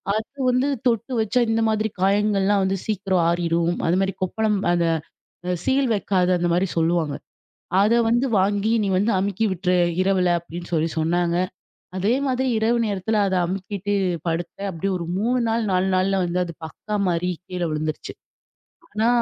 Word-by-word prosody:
அது 220 +6 -5
வந்து 255 +2 +1 0.2
தொட்டு 235 +2 0
வச்சா 220 +3 +1
இந்த 225 0 +1
மாதிரி 220 0 0
காயங்கள்லாம் 200 0 +2
வந்து 190 +1 0
சீக்கிர 195 -3 -2
ஆறிரும். 170 0 +1
அதுமாரி 190 +3 +1
கொப்பளம் 210 +3 0 0.2
அந்த 170 -1 +1 0.6
அ - - 0
சீல் 270 +1 +2
வைக்காத 190 -3 +1
அந்தமாரி 175 +2 +1
சொல்லுவாங்க. 165 -3 +1 0.7
அத 215 +3 +4
வந்து 240 +3 +2
வாங்கி 205 +3 +1
நீ 200 - 0
வந்து 205 +5 +2
அமுக்கி 200 +2 -1
விட்ரு. 180 0 0 0.3
இரவுல 185 -2 +2
அப்பிடின்னு 170 +1 -9
சொல்லி 160 0 +1
சொன்னாங்க. 170 +2 +1 0.6
அதே 200 +5 +1
மாதிரி 260 0 0
இரவு 225 +2 +2
நேரத்துல 210 +1 -1
அதை 190 -1 0
அமுக்கிட்டு, 195 +2 -3 0.3
படுத்தேன். 175 +4 -3
அப்பிடியே 190 +2 -2
ஒரு 170 - -5
3 245 +5 +1
நாள் 225 +1 0
4 185 +1 +2
நாள்ல 190 +1 +1
வந்து 175 +1 -1
அது 170 -1 -7
பக்கா 210 +6 -6
மாரி 180 +1 0 0.2
கீழே 180 -2 -2
விழுந்துருச்சு. 155 0 -3 0.8
ஆனா, 220 +2 +1
190 Hz, 155 wpm, -23 LUFS, 175-215 Hz, 0.8 s, அத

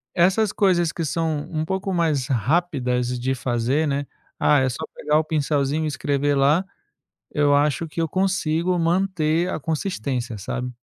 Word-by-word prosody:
Essas 190 +4 +3
coisas, 175 -5 +2
que 165 - -3
são 155 -1 -1
um 155 -1 -2
pouco 190 +3 -2
mais 155 -7 +1
rápidas 125 - 0
de 130 +2 -1
fazer, 130 +4 0
né, 140 0 -1 0.3
ah, 150 - +4
é 130 - +2
só 130 - -4
pegar 150 +1 +1
o 155 - +2
pincelzinho 150 -1 0
e - - 0
escrever 145 -1 0
lá, 145 +7 +3 0.7
eu 145 -1 +3
acho 145 +3 +2
que 165 - -3
eu 165 - +1
consigo 185 -1 0
manter 170 -1 +1
a - - -3
consistência, 130 - -3
sabe? 125 +6 -4
150 Hz, 160 wpm, -23 LUFS, 135-170 Hz, 0.7 s, ah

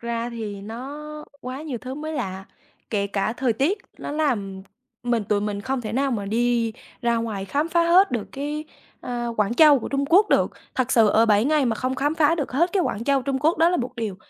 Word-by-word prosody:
ra 235 0 -3
thì 215 -4 -6
nó 240 +8 -7 0.4
quá 255 +3 -6
nhiều 285 -6 -4
thứ 255 +3 -7
mới 310 +2 -5
lạ, 195 -10 -4 0.5
kể 200 -2 0
cả 200 +1 -1
thời 245 0 0
tiết 295 - 0 0.2
nó - - -5
làm 215 -11 -1 0.4
mình 240 -3 0
tụi 205 +1 +1
mình 205 -1 -3
không 260 +4 -2
thể 215 -3 -5
nào 270 +3 +1
mà 210 -5 -2
đi 230 +1 +1 0.3
ra 235 -1 +2
ngoài 220 -4 -3
khám 290 - -1
phá 340 0 +3
hết 365 +4 +5
được 230 -5 -3
cái, 295 +2 -4 0.4
ơ, 240 -1 -3
Quảng 210 +2 +1
Châu 300 -1 +7
của - - -5
Trung 275 0 0
Quốc 390 +8 +5
được. - - +3 0.2
Thật 255 0 0
sự 225 -3 +5
ở 225 +2 +4
7 210 +1 +4
ngày 300 -1 +3
mà 235 -3 +1
không 255 +1 -1
khám 290 +4 0
phá 320 0 +3
được 290 -7 -3
hết 340 +7 +2
cái 385 - +2
Quảng 230 -8 -2
Châu 275 0 +2
Trung 270 0 -1
Quốc 310 +4 +2
đó 330 +1 +5
là 355 - +1
một 250 0 -3
điều 220 -5 -3
245 Hz, 235 wpm, -23 LUFS, 220-290 Hz, 0.5 s, Châu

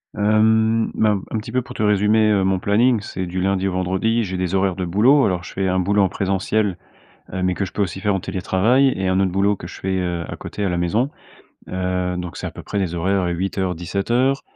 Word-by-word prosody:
Hem, 110 +1 +3
bah, 110 - +3
un 100 -2 -1
un - - +2
petit 115 +2 -8
peu 130 +1 +1
pour 125 0 -11
te 110 - -2
résumer, 105 +1 +3
heu, 100 -2 +2
mon 95 -1 +1
planning. 110 +3 +2
C'est 95 -2 -5
du 90 +1 -3
lundi 95 0 +1
au 95 - -2
vendredi. 95 +6 0
J'ai 95 -2 -4
des 90 +1 -1
horaires 95 -2 +1
de 95 -2 -3
boulot. 120 +11 +4
Alors, 90 -2 -1
je - - -10
fais 95 0 -1
un 95 0 +1
boulot 100 +3 +2
en 95 - +3
présentiel, 95 0 -1 0.6
heu, 95 - -2
mais 90 0 +2
que 100 - -1
je 90 - -9
peux 105 - -2
aussi 95 -1 -2
faire 105 -1 +1
en - - -1
télétravail 105 +9 +2
et 95 0 -2
un 95 +1 +2
autre 95 -2 +1
boulot 100 +2 +2
que 85 - -9
je - - -10
fais, 95 0 -1
heu, 85 -2 -2
à - - -4
côté, 105 - -6
à 95 - +1
la 90 - -1
maison. 105 +10 +1 0.6
Heu 90 -1 -2
donc 90 -1 -6
c'est - - -5
à - - -4
peu - - -10
près 100 - -4
les 90 -3 -1
horaires, 95 +3 0
heu, 85 - -1
08:00-17:00 95 +8 -1
95 Hz, 250 wpm, -21 LUFS, 90-105 Hz, 0.6 s, boulot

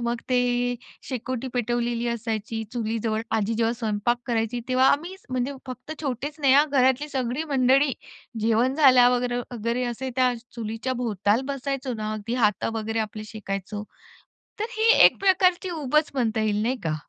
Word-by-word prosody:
मग 235 0 -1
ती 245 -1 +1 0.3
शेकोटी 255 0 -4
पेटवलेली 240 0 -1
असायची 225 -1 -3
चुलीजवळ, 225 -1 -1
आजी 220 +1 0
जेव्हा 230 +1 +1
स्वयंपाक 225 +1 -1
करायची 230 0 -1
तेव्हा 255 +1 +4
आम्ही, 340 +6 -1 0.2
म्हणजे 255 +2 -1
फक्त 255 +4 -7
छोटेच 280 +2 -3
नाही 270 -2 +4
हां 295 +2 +6
घरातली 265 +2 +2
सगळी 260 +2 -2
मंडळी, 265 +2 +4 0.5
जेवण 230 +4 +2
झाल्यावर 250 -4 +5 0.2
वगैरे 235 +2 -1
असे 245 +2 -4
त्या 255 -1 +3 0.2
चुलीच्याभोवताल 225 -2 -1
बसायचो 275 -2 -3
ना; 215 0 -3
अगदी 215 +3 -4
हात 210 -1 +1
वगैरे 225 0 -2
आपले 215 0 -8
शेकायचो. 205 0 -5 0.8
तर 435 - 0
ही 450 +1 +5
एक - - +5
प्रकारची 370 -1 +3
ऊबच 300 +3 +2
म्हणता 225 -4 0
येईल 210 -1 0
नाही 250 +3 0
का? 155 -1 0
245 Hz, 145 wpm, -25 LUFS, 225-260 Hz, 0.8 s, हां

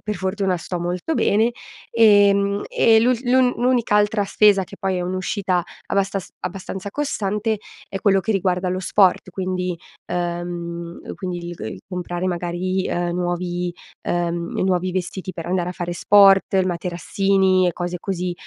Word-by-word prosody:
per 210 -1 -2
fortuna 190 -1 -1
sto 175 +1 -5
molto 180 - -2
bene. 225 -1 +3 0.4
Ehm, 200 -3 +4
e 230 - +4
l'ul 245 +1 +3
l'un 250 0 +4
l'unica 245 -4 +2
altra 205 0 +2
spesa, 200 -1 +4
che 200 +2 -10
poi 190 -3 -1
è - - -2
un'uscita 185 0 -1 0.2
abbastas 195 -1 -1 0.2
abbastanza 190 +2 -5
costante, 215 -6 -1 0.3
è 195 - -4
quello 195 -1 +3
che 220 - -3
riguarda 185 -2 0
lo 185 +1 -1
sport, 190 0 +2
quindi 185 -1 -2 0.4
uhm, 170 -1 -4
quindi 180 -3 -4
il 175 - -6
g - - -17
il 110 -3 -6
comprare, 180 0 -3
magari, 180 +2 -2
uhm, 175 0 -1
nuovi 175 0 -2 0.3
uhm, 170 -1 -1
nuovi 185 -1 0
vestiti 185 +1 -4
per 165 -1 -7
andare 180 0 -1
a - - -5
fare 175 0 -4
sport, 195 +1 +5
il 190 -1 +3
materassini, 185 +2 +1
e 175 - +1
cose 175 +1 -4
così; 180 -1 -3
185 Hz, 155 wpm, -21 LUFS, 175-200 Hz, 0.4 s, sport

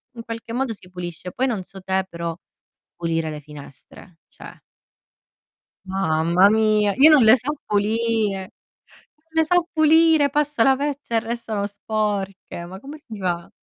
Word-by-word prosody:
In 230 - -8
qualche 230 0 -7
modo 250 -2 -1
si 180 -3 -16
pulisce. 180 0 -7
Poi 260 +1 0
non 210 -7 -2
so 195 +1 -13
te, 190 0 -1
però 170 -1 -4 0.6
pulire 165 -2 -2
le 150 -1 -7
finestre, 150 +3 -14
cioè - - -13 1.3
Mamma 180 0 +2
mia. 215 -2 +2
Io 300 +4 +7
non 285 -6 +6
le 220 +3 +8
so 275 +5 -3
pulire. 210 -2 0 0.8
Ne 320 - +4
so 350 +1 +2
pulire. 315 -1 +4
Passa 295 -4 +1
la 265 +1 +5
pezza 285 -4 -3
e - - +4
restano 225 -3 -3
sporche. 200 -4 -3
Ma 190 +2 -9
come 285 +6 -10
si 220 -7 -10
fa? 175 -2 -2
215 Hz, 150 wpm, -22 LUFS, 185-255 Hz, 1.3 s, le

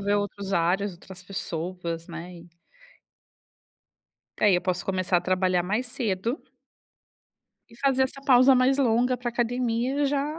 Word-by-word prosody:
ver 205 +1 +1
outros 200 -1 -3
ares, 190 +3 +1
outras 180 +1 -13
pessoas, 170 -2 -5
né, 170 +1 -8
e 170 0 -14 1.9
É, 210 - +4
e - - +4
eu 175 - +2
posso 180 -1 -2
começar 185 -1 0
a - - +2
trabalhar 185 -1 +1
mais 210 +8 -1
cedo 230 -1 -2 1.3
e 230 - -17
fazer 265 0 +2
essa 260 +1 -6
pausa 260 0 +6
mais 260 +2 +3
longa 250 0 +2
pra 245 0 -4
academia 245 +3 0
já 290 +3 -1
205 Hz, 145 wpm, -26 LUFS, 180-250 Hz, 1.9 s, pausa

